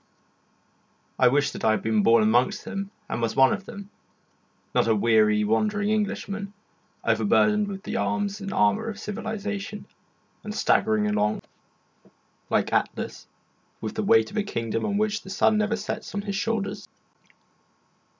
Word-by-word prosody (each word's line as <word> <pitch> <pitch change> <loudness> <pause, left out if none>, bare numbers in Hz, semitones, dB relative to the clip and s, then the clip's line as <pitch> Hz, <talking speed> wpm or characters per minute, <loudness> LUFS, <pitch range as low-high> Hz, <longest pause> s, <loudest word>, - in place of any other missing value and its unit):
I 125 - +6
wished 140 +3 +2
that - - -8
I 110 - +4
had 110 - +1
been 110 -1 +2
born 115 +1 +5
amongst 120 +4 +2
them 200 -3 -4 0.2
and - - -3
was 115 -1 -1
one 135 0 +5
of 195 - -5
them, 200 0 -10 0.8
not - - +2
a 110 - +3
weary, 105 -1 +3
wandering 205 - +1
Englishman, 205 -1 -2 0.5
overburdened 210 -1 +3
with 195 0 -6
the 225 - -3
arms 205 -3 -1
and 195 0 -5
armour 105 - +2
of 215 - -6
civilisation, 210 -1 -5 0.6
and 210 0 -6
staggering 110 - +2
along, 105 0 0 1.1
like - - +1
Atlas, - - -2 0.5
with - - -5
the - - -2
weight 110 0 +3
of - - -6
a 210 - +2
kingdom 115 - -2
on 205 -1 0
which 215 0 0
the - - -12
sun 215 +2 +2
never 215 +1 +1
sets 210 -1 -5
on 200 - -2
his 200 -1 -3
shoulders. 215 0 -2
200 Hz, 155 wpm, -25 LUFS, -, 1.1 s, I